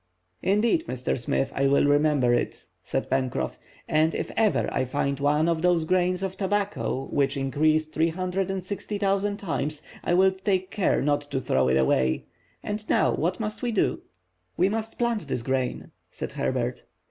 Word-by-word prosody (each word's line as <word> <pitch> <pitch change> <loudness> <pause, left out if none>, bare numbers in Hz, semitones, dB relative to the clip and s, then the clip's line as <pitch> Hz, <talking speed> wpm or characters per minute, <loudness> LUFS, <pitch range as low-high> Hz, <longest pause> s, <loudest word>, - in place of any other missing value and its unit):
"Indeed, 230 - +2
Mr. 125 0 -1
Smith, 130 +2 -1
I 140 0 +2
will 140 +1 +4
remember 145 -4 +3
it," 120 - -1 0.2
said - - -2
Pencroff, 125 - -1 0.3
"and 155 +1 +2
if - - -3
ever 220 -2 +2
I - - +1
find 140 +1 -1
one 150 +3 +2
of 165 -1 +1
those 175 -2 +3
grains 180 +1 +1
of 190 -1 -3
tobacco 200 -8 -1
which 140 0 +1
increase 155 +3 +2
360,000 195 +4 -1
times, 155 -6 -3 0.2
I'll 190 +2 +4
take 190 -1 -1
care 205 - +1
not 145 0 0
to 135 - -1
throw 65 - +1
it 65 +1 +3
away. 65 -1 +2 0.4
And 210 +1 -4
now - - +3
what 175 +4 -1
must 215 -1 -4
we 245 - -1
do?" 215 - +1 0.6
"We 185 +2 +3
must 220 +1 -3
plant 235 -3 0
this 115 - -2
grain," 130 0 -2 0.2
said - - -6
Herbert. - - -2
165 Hz, 160 wpm, -26 LUFS, 140-195 Hz, 0.6 s, will